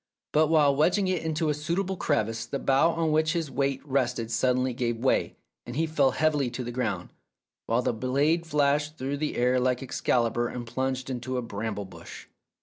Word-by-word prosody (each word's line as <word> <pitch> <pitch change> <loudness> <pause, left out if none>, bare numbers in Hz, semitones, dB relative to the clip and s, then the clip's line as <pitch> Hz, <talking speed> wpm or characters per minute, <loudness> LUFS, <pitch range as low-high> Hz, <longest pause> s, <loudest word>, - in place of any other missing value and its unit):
But 155 +1 +4
while 150 -3 +4
wedging 180 +7 +2
it 185 -3 0
into 160 0 -1
a - - +2
suitable 170 +6 -2
crevice 115 - -1
the 140 - -3
bough 135 +5 +3
on 165 -1 0
which 155 +1 +2
his 165 -5 -2
weight 135 +1 0
rested 125 -4 -1
sud 125 +2 +2
denly 130 -1 -1
gave 120 -1 -1
way, 130 +3 +1 0.3
and 120 - -8
he 160 +3 +1
fell 150 -4 +2
heavily 150 -3 +1
to 125 +1 -5
the 120 - -5
ground, 125 +1 -2 0.6
while 115 +2 +1
the - - +1
blade 140 +8 +1
flashed 150 0 +1
through 135 +2 -3
the 150 +1 -2
air 125 +1 +2
like 125 +1 0
Excalibur 120 -2 0
and 120 0 -6
plunged 130 +2 -2
into 130 +1 -3
a 125 - -2
bramble 105 -2 -4
bush. 95 - -11
135 Hz, 195 wpm, -27 LUFS, 120-155 Hz, 0.6 s, But